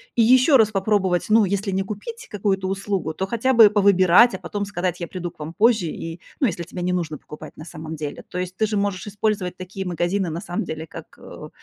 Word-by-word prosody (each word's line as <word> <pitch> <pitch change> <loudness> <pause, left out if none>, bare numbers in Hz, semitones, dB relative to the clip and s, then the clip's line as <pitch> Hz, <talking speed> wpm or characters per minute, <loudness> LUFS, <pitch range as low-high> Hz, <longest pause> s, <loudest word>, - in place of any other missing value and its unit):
и 230 - +4
ещё 255 +4 +6
раз 215 -2 +3
попробовать, 195 -3 +1
ну, 215 -1 +5
если 200 +2 -2
не 195 0 0
купить 455 - -7
какую-то 195 -2 -1
услугу, 195 -4 -2
то 190 +3 -3
хотя 235 +4 0
бы 225 -3 +8
повыбирать, 200 +2 +5
а - - -5
потом 205 -1 -4
сказать: 180 -3 -3
"Я 170 - -3
приду 180 -1 -5
к - - -23
вам 155 +2 -7
позже". 215 -2 +3
И, 165 +2 -6 0.2
ну, 270 - +3
если 175 -4 -3
тебе 175 +2 -7
не 180 +1 0
нужно 160 -5 -3
покупать 150 - -10
на 155 - -9
самом 160 -1 -7
деле. 150 -1 -6
То - - -6
есть, 180 0 -4
ты 220 - +1
же 210 -1 -2
можешь 200 -1 -1
использовать 200 -3 -2
такие 190 +1 -6
магазины 180 +2 -1
на 160 +1 -4
самом 175 -3 -3
деле 160 +1 -6
как, - - -11
э, - - -10
190 Hz, 230 wpm, -22 LUFS, 175-210 Hz, 0.2 s, бы